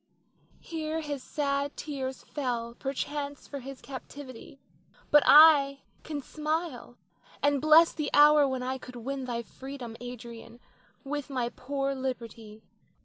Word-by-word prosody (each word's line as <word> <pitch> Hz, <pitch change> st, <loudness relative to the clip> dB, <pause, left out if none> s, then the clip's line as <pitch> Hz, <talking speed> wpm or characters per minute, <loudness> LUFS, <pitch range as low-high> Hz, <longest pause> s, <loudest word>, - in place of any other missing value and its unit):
Here 320 Hz, -1 st, -4 dB
his 290 Hz, -3 st, -4 dB
sad 280 Hz, 0 st, -2 dB
tears 265 Hz, -3 st, -5 dB
fell 240 Hz, -5 st, -3 dB
perchance 280 Hz, +2 st, -4 dB
for 280 Hz, -, -6 dB
his 270 Hz, +1 st, -10 dB
captivity; 270 Hz, -1 st, -10 dB, 0.5 s
but 295 Hz, -, +8 dB
I 285 Hz, -3 st, +8 dB, 0.2 s
can 295 Hz, -3 st, -5 dB
smile 305 Hz, -5 st, -3 dB, 0.5 s
and 285 Hz, -1 st, +3 dB
bless 310 Hz, +2 st, +6 dB
the 300 Hz, -2 st, -2 dB
hour 295 Hz, 0 st, +7 dB
when 260 Hz, -1 st, -2 dB
I 260 Hz, +1 st, -3 dB
could 250 Hz, -1 st, -11 dB
win 265 Hz, +3 st, -4 dB
thy 235 Hz, -2 st, -3 dB
freedom, 260 Hz, -2 st, -9 dB
Adrian, 235 Hz, -1 st, -9 dB, 0.4 s
with 290 Hz, -1 st, -4 dB
my 250 Hz, -3 st, -1 dB
poor 275 Hz, +2 st, -3 dB
liberty. 230 Hz, -5 st, -6 dB
275 Hz, 130 wpm, -29 LUFS, 250-290 Hz, 0.5 s, but